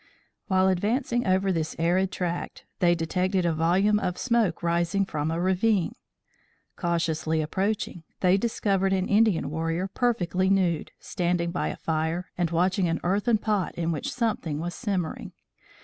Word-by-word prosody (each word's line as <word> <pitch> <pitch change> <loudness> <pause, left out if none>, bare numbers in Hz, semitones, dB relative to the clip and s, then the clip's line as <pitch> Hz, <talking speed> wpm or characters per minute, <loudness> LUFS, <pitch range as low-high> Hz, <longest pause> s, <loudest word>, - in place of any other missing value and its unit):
While 190 -1 +3
advancing 235 +6 0
over 190 +1 +2
this 160 -3 -2
arid 180 +3 +1
tract, 175 -1 -4
they 175 -1 +4
detected 180 +3 0
a 170 - +2
volume 185 +6 +3
of 180 -3 -2
smoke 230 -9 +1
rising 170 +3 +1
from 150 -4 -2
a 165 +1 -1
ravine. 190 +1 +1 0.8
Cautiously 165 -2 0
approaching, 190 +2 -2 0.2
they 185 0 +4
discovered 195 -3 +1
an 190 -1 0
Indian 205 -9 +2
warrior 165 +3 -1
perfectly 190 -4 0
nude, 180 -5 +1
standing 175 -1 -1
by 175 - -1
a - - -4
fire 160 +3 -2
and 175 -2 0
watching 180 +2 +1
an 165 0 -1
earthen 205 +6 +2
pot 210 -3 -1
in 170 0 -1
which 150 -4 -3
something 210 -11 -1
was 175 +2 -3
simmering. 190 -8 -3
180 Hz, 150 wpm, -26 LUFS, 170-195 Hz, 0.8 s, they